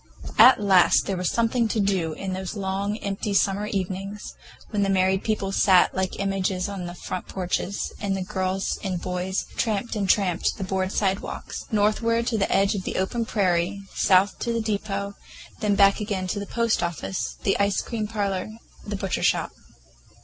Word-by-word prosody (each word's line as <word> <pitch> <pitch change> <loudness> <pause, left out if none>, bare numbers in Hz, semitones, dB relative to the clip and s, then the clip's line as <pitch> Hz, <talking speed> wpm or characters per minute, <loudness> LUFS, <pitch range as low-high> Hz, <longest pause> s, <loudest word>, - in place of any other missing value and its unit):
At 245 +4 +9
last 195 -4 +5
there 195 - -1
was 180 -1 0
something 235 0 +1
to 220 - -1
do 190 -5 +1
in 190 +3 -4
those 190 +2 -4
long, 200 +1 -2
empty 200 +1 -2
summer 200 +1 +2
evenings, 195 0 -4 0.4
when 210 -2 0
the 200 - +1
married 190 0 +2
people 210 -3 -1
sat 190 -2 +4
like 190 0 -2
images 195 -1 -1
on 195 -3 -5
their 175 - -7
front 180 - -5
porches, 185 +1 -2
and 195 -2 -1
the 190 - -2
boys 190 -1 -2
and 185 -3 -2
girls 180 +2 -2
tramped 225 0 -1
and 200 -3 -1
tramped 185 -5 +2
the 200 - -4
board 190 0 -1
sidewalks—northward 215 +3 0
to 235 -2 0
the 195 - 0
edge 195 0 +3
of 200 - -2
the - - -4
open 225 +5 -1
prairie, 185 -2 +1
south 190 +1 +3
to 235 - -1
the 230 - 0
depot, 200 -2 -2 0.5
then 205 -1 +1
back 200 0 +5
again 200 -3 -2
to 205 - -2
the 200 - -6
post 230 -1 +1
office, 175 +2 -3
the 195 - +1
ice 200 0 +1
cream 220 -3 -3
parlor, 200 -3 -2 0.3
the 205 - -4
butcher 195 -1 -2
shop. - - +1
195 Hz, 180 wpm, -25 LUFS, 190-210 Hz, 0.5 s, At